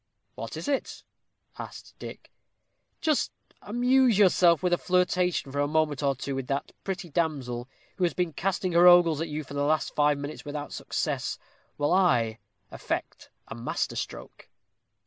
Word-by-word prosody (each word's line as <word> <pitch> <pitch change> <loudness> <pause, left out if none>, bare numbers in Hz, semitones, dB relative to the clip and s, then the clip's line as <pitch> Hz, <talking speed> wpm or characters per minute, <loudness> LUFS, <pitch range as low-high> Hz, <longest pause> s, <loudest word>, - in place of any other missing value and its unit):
"What - - -7
is - - -6
it?" 280 -2 -2 0.6
asked - - -9
Dick. - - -9 0.7
"Just 310 -3 +1 0.3
amuse 245 0 +3
yourself 180 -4 +5
with 180 -1 +2
a - - +4
flirtation 180 -4 +1
for 145 - -3
a 145 - +2
moment 150 -2 +1
or 140 -1 +1
two 140 +1 -4
with 135 -1 -4
that 140 0 -2
pretty 190 -2 -4
damsel, 135 -6 -2 0.3
who 185 - -1
has 175 - +1
been 175 -3 -1
casting 185 +2 -1
her 175 +1 +6
ogles 170 -3 +6
at 165 - -2
you 155 +1 -3
for 140 - -11
the 140 - -1
last 155 +2 +1
five 150 -1 +3
minutes 145 +2 -6
without 145 0 -6
success, - - -2 0.4
while 145 +3 +1
I 120 - +3 0.3
effect - - -4 0.2
a - - -7
master 115 +1 -3
stroke." - - -7
160 Hz, 165 wpm, -27 LUFS, 145-180 Hz, 0.7 s, her